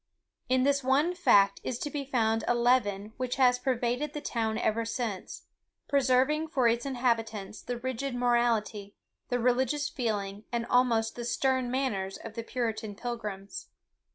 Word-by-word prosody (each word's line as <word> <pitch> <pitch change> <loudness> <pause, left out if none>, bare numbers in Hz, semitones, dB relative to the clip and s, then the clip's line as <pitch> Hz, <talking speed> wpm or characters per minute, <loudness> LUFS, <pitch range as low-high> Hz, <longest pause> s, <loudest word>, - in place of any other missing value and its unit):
In 255 0 +3
this 280 0 +2
one 285 +7 +2
fact 200 - +4
is 245 - -3
to 290 - -4
be 290 -1 -3
found 225 -4 +1
a 240 - +3
leaven 220 -4 +1
which 255 -1 -2
has 250 -2 +4
pervaded 250 +3 -1
the 295 - -3
town 225 -5 -2
ever 230 0 0
since, 225 -4 -4 0.4
preserving 280 +3 +2
for 260 -6 +2
its 235 +3 +1
inhabitants 225 -6 -1
the 245 - -4
rigid 260 +1 -3
morality, 235 -4 0 0.3
the 245 - +1
religious 260 +4 +1
feeling, 210 -7 -3
and 235 -1 -1
almost 235 -2 +2
the 240 - -5
stern 260 +1 0
manners 210 -8 -1
of 225 - -9
the 230 - -4
Puritan 225 -4 -3
pilgrims. 215 - -6
240 Hz, 155 wpm, -29 LUFS, 225-260 Hz, 0.4 s, fact